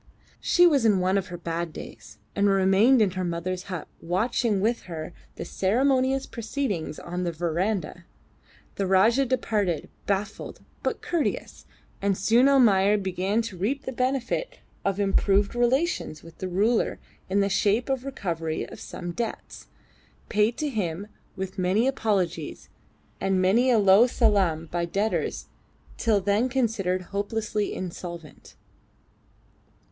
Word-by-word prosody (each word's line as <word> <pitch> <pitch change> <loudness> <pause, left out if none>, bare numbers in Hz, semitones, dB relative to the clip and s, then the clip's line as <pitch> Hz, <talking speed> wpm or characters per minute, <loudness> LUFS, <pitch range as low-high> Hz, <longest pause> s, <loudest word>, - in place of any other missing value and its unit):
She 355 - +4
was 290 -7 +4
in 215 -3 +4
one 185 +1 +1
of 195 -2 0
her 175 - -7
bad 170 -1 -3
days, - - -11 0.2
and 200 0 +3
remained 195 +6 +5
in 195 - +1
her 185 0 -3
mother's 180 +2 -3
hut 180 -5 -5
watching 210 +4 0
with 230 +4 0
her 160 0 -6 0.2
the - - -6
ceremonious 260 +6 +1
proceedings 220 - -3
on 180 +1 -4
the 175 - -1
verandah. 175 +2 -2 0.7
The 195 - 0
Rajah 225 +8 +4
departed, 210 -9 -1 0.2
baffled 200 0 -3 0.2
but - - -2
courteous, 340 -3 -2 0.3
and 195 -1 +1
soon 245 +4 +4
Almayer 210 -7 +5
began 190 +3 -1
to 215 -5 -7
reap 255 +10 -1
the - - -4
benefit 260 - -1 0.3
of 195 0 -1
improved 200 0 +2
relations 245 - 0
with 165 0 -14
the 185 - -3
ruler 210 +6 +1 0.3
in 200 +2 +2
the 200 - +2
shape 205 +4 +1
of 270 -1 0
the 270 - -9
recovery 165 -11 -3
of - - -11
some 175 -1 -6
debts, 230 +5 -5 0.6
paid 215 +2 +2
to 300 - -1
him 200 - -3 0.3
with 190 -1 -5
many 185 +6 +2
apologies 190 - -1 0.5
and 195 -1 +1
many 215 +8 +3
a 240 - +5
low 200 +3 +6
salaam 195 -10 +2
by 175 0 -1
debtors 200 +6 -1 0.5
till 220 -3 +2
then 205 +6 +1
considered 215 -8 0
hopelessly 210 +1 -1
insolvent. 170 -3 -8
200 Hz, 140 wpm, -26 LUFS, 180-235 Hz, 0.7 s, low